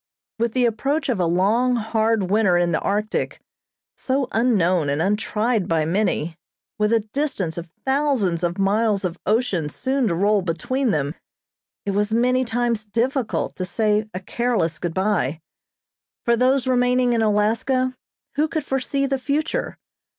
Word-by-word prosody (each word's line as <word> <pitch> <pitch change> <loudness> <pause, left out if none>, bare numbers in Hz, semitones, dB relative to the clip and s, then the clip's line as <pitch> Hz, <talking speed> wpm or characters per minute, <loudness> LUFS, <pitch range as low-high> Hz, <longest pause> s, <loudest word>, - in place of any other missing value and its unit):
With 230 -1 0
the 255 -1 +2
approach 275 +7 0
of 235 -6 0
a 175 - +2
long, 215 +9 +2
hard 220 -3 0
winter 200 -4 +4
in 175 -1 +2
the 165 - +1
Arctic, 210 +2 -1 0.6
so 265 0 -1
unknown 185 - +2
and 140 +1 0
untried 210 +3 0
by 160 -2 +1
many, 170 -3 0 0.4
with 210 +1 +2
a 230 -1 +3
distance 260 - -1
of 170 0 -7 0.2
thousands 265 - +1
of 175 +2 -1
miles 200 0 +1
of 175 0 -4
ocean 210 -8 +1
soon 260 - -1
to 170 - 0
roll 205 +3 +2
between 210 - -1
them, 145 -5 0 0.7
it 200 - 0
was 205 +2 0
many 250 +2 +3
times 235 -2 -1
difficult 235 +2 -1
to 185 - -2
say 215 +3 0
a 185 - -5
careless 190 -5 -1
good 170 -2 -3
bye. 190 -7 0 0.9
For 235 - +4
those 255 +2 +2
remaining 250 -1 +2
in 230 - +1
Alaska, 225 +5 +1 0.4
who 305 +2 +3
could 315 -2 -3
foresee 270 +1 -1
the 270 -1 -1
future? 295 - -2
220 Hz, 155 wpm, -22 LUFS, 185-250 Hz, 0.9 s, winter